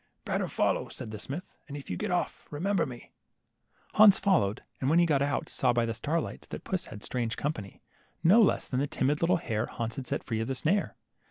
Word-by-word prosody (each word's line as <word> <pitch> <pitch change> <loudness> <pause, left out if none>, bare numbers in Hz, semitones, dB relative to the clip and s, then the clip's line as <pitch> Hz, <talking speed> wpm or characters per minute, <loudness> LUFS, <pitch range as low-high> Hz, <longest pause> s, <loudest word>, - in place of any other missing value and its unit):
Better - - 0
follow," - - 0
said 110 - -7
the 105 - -6
smith, 150 - -7
and 145 0 -6
if 140 - -9
you - - -1
get - - -3
off, - - -2
remember 190 +4 0
me." 120 -2 -10 0.8
Hans 210 -2 +8
followed, 130 - +2 0.2
and 130 - 0
when 160 - +4
he 175 - +6
got 145 -4 +2
out, 140 -2 0
saw 125 -2 +2
by 120 -1 +2
the 115 - -2
starlight 150 +8 -3
that - - -6
puss 185 -2 -2
had 105 -1 -10
strange 120 -3 -2
company, 110 -10 -4 0.4
no 190 +8 +7
less 215 - +3
than 125 - -1
the 140 - +1
timid 145 +2 0
little 175 +1 +4
hare 115 -7 -2
Hans 115 -1 -4
had 130 -2 -5
set - - -2
free 110 -3 -2
of 115 - -2
the 135 - -2
snare. 185 +10 +1
140 Hz, 225 wpm, -29 LUFS, 115-170 Hz, 0.8 s, Hans